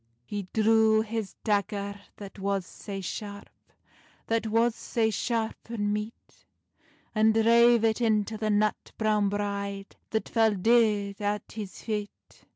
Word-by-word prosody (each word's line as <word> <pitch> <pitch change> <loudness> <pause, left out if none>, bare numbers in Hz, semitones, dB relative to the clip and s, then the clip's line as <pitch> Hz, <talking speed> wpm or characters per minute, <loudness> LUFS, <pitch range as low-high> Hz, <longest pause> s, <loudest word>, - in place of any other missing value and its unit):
He 205 +2 -5
drew 220 0 +4
his 220 -2 -4
dagger 200 -1 -1 0.2
that 200 0 -10
was 195 -1 -1
sae 195 0 -7
sharp, 205 +2 -6 0.7
That 225 0 0
was 230 +2 +2
sae 220 -1 -1
sharp 225 0 -2
and 205 -3 -1
meet, 210 +2 -7 0.7
And 220 0 +3
drave 235 +1 +5
it 225 +1 +2
into 220 -1 +1
the 215 0 -2
nut 210 0 0
browne 210 -2 +2
bride, 200 -1 -4
That 220 - -1
fell 225 -2 +3
deid 210 -1 +2
at 205 0 -2
his 210 -3 -6
feit. 210 -2 -6
215 Hz, 135 wpm, -28 LUFS, 205-225 Hz, 0.7 s, drave